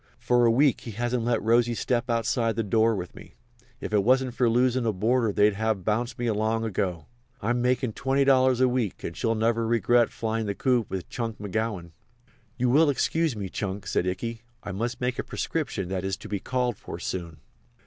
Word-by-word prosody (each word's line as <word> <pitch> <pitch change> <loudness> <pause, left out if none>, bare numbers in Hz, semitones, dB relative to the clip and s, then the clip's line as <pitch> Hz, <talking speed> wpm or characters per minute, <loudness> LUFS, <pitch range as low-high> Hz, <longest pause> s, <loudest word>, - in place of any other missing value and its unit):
"For 120 0 +3
a - - +5
week 135 +4 +3
he 115 - -7
hasn't 120 +2 -1
let 120 -2 +1
Rosy 120 +1 +3
step 120 +1 -1
outside 115 0 +1
the 115 - 0
door 110 +2 +2
with 90 -2 -6
me. - - -14 0.4
If - - -6
it 105 -2 +3
wasn't 130 +2 +2
for 125 -1 +2
losin' 125 +2 +2
a - - +3
boarder 110 +3 +1
they'd 105 +1 +3
have 110 -2 -1
bounced 120 +4 -1
me 120 -2 0
long 110 +2 0
ago. 90 -6 -2 0.3
I'm 120 +3 0
makin' 125 -1 +1
$20 135 -1 +3
a 130 - +5
week 125 -6 -2
and 85 - -5
she'll 115 -1 0
never 115 +1 +1
regret 120 +1 +3
flyin' 110 -1 -3
the 100 - -2
coop 125 -3 +1
with 95 -2 -4
Chunk 115 -2 -4
McGowan." 105 -4 -3 0.7
"You 125 0 +1
will 150 +3 +5
excuse 160 +1 +1
me, 100 -2 -4
Chunk," 95 +1 -4
said 90 -1 0
Ikey. 115 +5 -3 0.2
"I - - -5
must 115 +6 -3
make 125 0 -1
a - - 0
prescription 135 - -3
that 95 -1 -2
is 95 -1 -2
to - - -10
be 100 - -3
called 125 -2 -1
for - - -8
soon." 85 -4 -5
115 Hz, 200 wpm, -26 LUFS, 105-125 Hz, 0.7 s, a